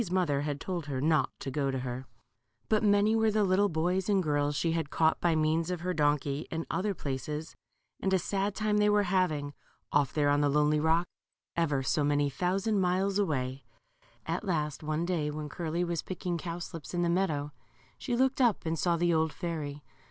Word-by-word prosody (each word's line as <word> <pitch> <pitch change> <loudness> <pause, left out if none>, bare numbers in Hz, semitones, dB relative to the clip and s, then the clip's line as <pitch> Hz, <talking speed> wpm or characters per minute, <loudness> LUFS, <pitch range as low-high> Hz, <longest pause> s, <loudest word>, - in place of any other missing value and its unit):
121 145 - -1 0.6
But 215 -1 +3
many 205 +1 +4
were 220 0 +3
the 215 0 +2
little 200 +1 +3
boys 180 +4 0
and 195 -2 +3
girls 145 -1 0
she 165 +3 +1
had 165 -3 -1
caught, 160 +1 +2
by 170 -2 +3
m^ans 160 +2 +1
of 180 -2 -3
her 180 +1 -1
donkey, 145 -2 0
in 165 0 -3
other 200 +1 -1
places, 150 +2 -4 0.5
and 190 - 0
a 190 - +5
sad 195 +2 -1
time 215 -1 +1
they 210 0 +4
were 205 0 +4
having, 175 -7 0 0.4
off 145 -1 +2
there 145 -2 +2
on 145 0 +3
the 145 - +3
lonely 150 +1 +3
rock, 160 +3 +2 0.5
ever 150 -5 +1
so 150 +3 +1
many 145 0 +2
thousand 195 - 0
miles 190 +2 +1
away. 135 -8 -1 0.6
At 165 +5 -2
last 155 -7 -1
one 155 +2 -1
day, 165 -4 0
when 150 0 -5
Curly 170 +2 -2
was 170 -2 -1
picking 180 -1 -4
cow 170 0 -4
slips 165 -2 -7
in 175 - +1
the - - +2
meadow, 160 -5 0 0.5
she 245 -3 -2
looked 265 +2 +2
up 235 -8 +2
and 160 0 -1
saw 170 +4 +2
the 175 0 +2
old 160 -1 +2
fairy. 150 -5 -5
165 Hz, 180 wpm, -30 LUFS, 145-185 Hz, 0.6 s, a